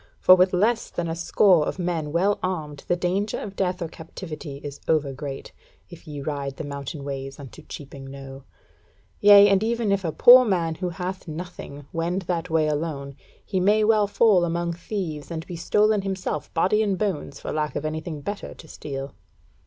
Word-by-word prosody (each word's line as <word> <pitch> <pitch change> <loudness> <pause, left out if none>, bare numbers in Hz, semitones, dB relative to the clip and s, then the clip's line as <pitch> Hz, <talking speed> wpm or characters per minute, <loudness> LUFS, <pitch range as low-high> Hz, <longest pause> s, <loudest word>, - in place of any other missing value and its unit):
For 185 - +8
with 185 0 +5
less 220 +6 +1
than 175 - -3
a 165 - -2
score 175 -1 +3
of - - -3
men 170 -4 -2
well 190 +5 +2
armed 155 -6 -4
the 175 - +2
danger 185 +4 -1
of 200 -1 -7
death 180 -2 -1
or - - -3
captivity 160 -3 -8
is 145 -1 -7
over 150 -4 +1
great, 135 0 -7 0.4
if 175 - -13
ye 145 -2 -6
ride 140 -2 -4
the - - -4
mountain 140 +1 -6
ways 135 0 -6
unto 135 -3 -11
Cheaping 140 -1 -10
Knowe. 135 0 -10 0.8
Yea, 205 0 +8
and 195 -1 +3
even 230 -1 0
if 200 -1 +1
a 165 - -1
poor 250 +9 +8
man 175 -7 0
who 180 +3 -3
hath 180 +2 -5
nothing, 155 -3 -8
wend 175 +3 -1
that 175 0 -2
way 160 -1 +2
alone, 145 -2 -3 0.3
he 190 - -1
may 210 +4 +3
well 215 -1 +4
fall 205 -3 +4
among 170 0 -1
thieves, 170 -4 -5
and 165 -1 -5
be 175 - -7
stolen 210 +4 +2
himself 190 -1 -4
body 190 +6 +3
and 200 -3 0
bones, 180 -9 -3
for - - -5
lack 150 -2 -2
of 150 - -3
anything 155 0 -4
better 200 +7 -6
to 160 - -14
steal." 135 -3 -6
170 Hz, 190 wpm, -24 LUFS, 150-195 Hz, 0.8 s, For